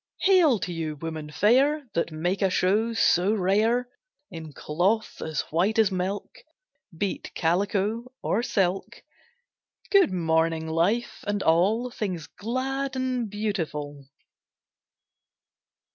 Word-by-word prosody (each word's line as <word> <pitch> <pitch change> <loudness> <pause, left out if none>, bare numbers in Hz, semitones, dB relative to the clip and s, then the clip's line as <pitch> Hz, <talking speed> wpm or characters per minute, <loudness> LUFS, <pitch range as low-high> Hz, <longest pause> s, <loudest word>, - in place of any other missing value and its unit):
Hail 355 - +5
to 175 +1 -3
you 160 -2 -3
women 155 0 -6
fair, 270 - +3
That 170 0 -1
make 175 +6 -2
a 195 - +3
show 205 +6 +1
so 200 -2 +3
rare 220 +6 +2 0.4
In 160 -3 -8
cloth 180 - -1
as 155 -3 -2
white 185 +8 +1
as 220 -3 +4
milk 190 +2 -3 0.6
Be't 195 +2 -3
calico 205 +7 0
or 220 - +1
silk: 195 -6 -1 0.9
Good 395 -5 +5
morning, 160 -2 +1
Life 180 +9 0
and 205 -1 -1
all 205 +10 +2
Things 185 -9 -4
glad 265 +4 -3
and 255 -3 -1
beautiful. 160 -9 -4
195 Hz, 115 wpm, -26 LUFS, 165-230 Hz, 0.9 s, Hail